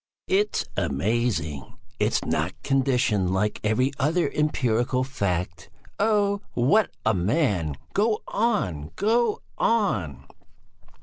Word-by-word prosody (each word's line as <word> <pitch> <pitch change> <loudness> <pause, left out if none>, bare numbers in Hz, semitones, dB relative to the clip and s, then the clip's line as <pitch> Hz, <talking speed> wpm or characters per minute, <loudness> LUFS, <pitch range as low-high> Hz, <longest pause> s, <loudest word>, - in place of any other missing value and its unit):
"It's 205 +2 +1
amazing! 85 - -1 0.2
It - - +1
is - - 0
not - - -1
conditioned 125 -9 +1
like 105 +2 0
every 125 +5 +2
other 160 +6 +2
empirical 125 -4 +1
fact. 90 -9 -3 0.3
Oh! 205 -1 +2
What 165 - +3 0.2
a 110 - +4
man! 95 - 0 0.2
Go 215 +1 +1
on! 115 - -1
Go 225 +2 +1 0.2
on!" 100 - 0
125 Hz, 105 wpm, -25 LUFS, -, 0.3 s, a